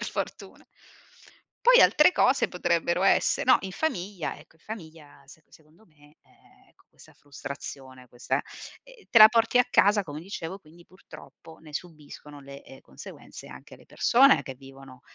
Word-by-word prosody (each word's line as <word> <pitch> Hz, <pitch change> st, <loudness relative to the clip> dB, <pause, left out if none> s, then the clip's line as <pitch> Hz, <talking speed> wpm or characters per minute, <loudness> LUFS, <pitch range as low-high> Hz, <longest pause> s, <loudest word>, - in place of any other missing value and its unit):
per -, -, -5 dB
fortuna. -, -, -7 dB, 1.0 s
Poi -, -, +7 dB
altre 300 Hz, -, +5 dB
cose 260 Hz, -5 st, +1 dB
potrebbero 170 Hz, 0 st, -1 dB
esse 195 Hz, -, +1 dB
no, 255 Hz, -, +4 dB
in 190 Hz, -1 st, -7 dB
famiglia, 195 Hz, -, -4 dB
ecco, 155 Hz, +2 st, -20 dB
in 160 Hz, -, -31 dB
famiglia 160 Hz, -9 st, -12 dB
se 155 Hz, +3 st, -18 dB
secondo 160 Hz, +7 st, -23 dB
me, 150 Hz, -2 st, -25 dB
ehm, -, -, -28 dB
ecco, -, -, -31 dB
questa -, -, -21 dB
frustrazione, 135 Hz, -2 st, -11 dB
questa 120 Hz, +1 st, -4 dB, 0.4 s
ehm, -, -, -19 dB
te 230 Hz, -, +3 dB
la 215 Hz, 0 st, +11 dB
porti 230 Hz, +1 st, +1 dB
a 250 Hz, -, +4 dB
casa, 205 Hz, -3 st, +3 dB
come 150 Hz, -1 st, -9 dB
dicevo, 185 Hz, 0 st, -8 dB
quindi 170 Hz, +1 st, -20 dB
purtroppo 165 Hz, -3 st, -16 dB
ne 155 Hz, -2 st, -16 dB
subiscono 150 Hz, -3 st, -10 dB
le, 140 Hz, 0 st, -13 dB
ehm, 135 Hz, -, -16 dB
conseguenze -, -, -13 dB
anche -, -, -14 dB
le -, -, -21 dB
persone 270 Hz, +3 st, +3 dB
che 135 Hz, -, -8 dB
vivono 135 Hz, -1 st, -16 dB
165 Hz, 160 wpm, -25 LUFS, 145-210 Hz, 1.0 s, la